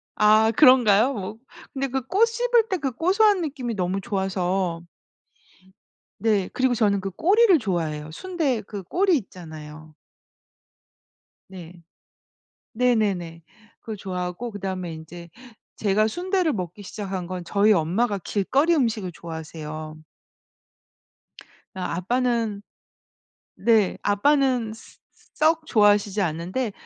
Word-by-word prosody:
아 215 +1 +4
그런가요? 255 -4 +6
뭐 205 +1 -6 0.4
근데 270 0 -2
그 265 0 -2
꼬 400 +8 +3
씹을 470 0 +1
때 380 - 0
그 270 -3 -2
고소한 390 - +3
느낌이 265 -7 -4
너무 185 0 -1
좋아서 190 -4 -2 1.4
네. 205 -3 +1
그리고 255 -1 +2
저는 205 -3 +2
그 195 0 -4
꼬리를 385 - +4
좋아해요. 160 - -3
순대 300 - -2
그 200 -1 -8
꼬리 365 - +2
있잖아요. 155 - -11 1.6
네. 180 -3 -10 1.0
네네네. 205 -9 0 0.4
그걸 220 -2 -7
좋아하고 185 +4 -5
그다음에 190 -4 -5
인제 170 +2 -10 0.5
제가 215 +1 +1
순대를 360 - 0
먹기 185 0 -6
시작한 190 -3 -5
건 185 -1 -5
저희 205 +3 +3
엄마가 200 +6 0
길거리 265 - +1
음식을 220 - 0
좋아하세요. 155 -1 -8 1.7
아 180 -2 -3
아빠는 230 +1 -1 0.9
네. 220 -4 +2
아빠는 250 +1 +2
써 225 - -15 0.2
써 - - -29
썩 315 +1 +2
좋아하시지 205 -4 +3
않는데 185 +8 -2
210 Hz, 245 characters per minute, -24 LUFS, 180-260 Hz, 1.7 s, 그런가요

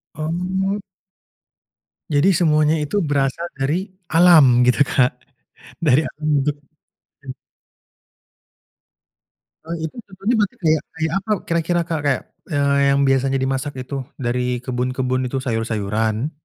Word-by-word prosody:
Oh. 185 +5 -2 1.3
Jadi 145 +6 +4
semuanya 155 -2 +3
itu 150 +6 -3
berasal 140 +4 0
dari 150 +8 -1 0.2
alam 155 -8 +6
gitu, 125 +3 +3
Kak, 125 -2 +3 0.7
dari 145 -1 +4
alam 155 0 -7
untuk 145 +1 0 0.7
mmm. 135 - -6 2.4
Oh 170 - -3
itu, 160 -1 -4 0.2
contohnya 195 +5 -1
berarti 205 -2 0
kayak 155 -1 +3
kayak 160 0 -1
apa 210 +3 -6
kira-kira, 170 +1 0
Kak? 165 -2 -3
Kayak, 140 -3 +1 0.3
eee, 140 -3 +1 0.2
yang 140 - +2
biasanya 135 0 +2
dimasak 135 +2 -2
itu 130 +2 -6 0.2
dari 125 -1 -2
kebun-kebun 130 0 -1
itu, 135 +2 -3
sayur-sayuran? 110 +1 -1
145 Hz, 115 wpm, -20 LUFS, 130-165 Hz, 2.4 s, alam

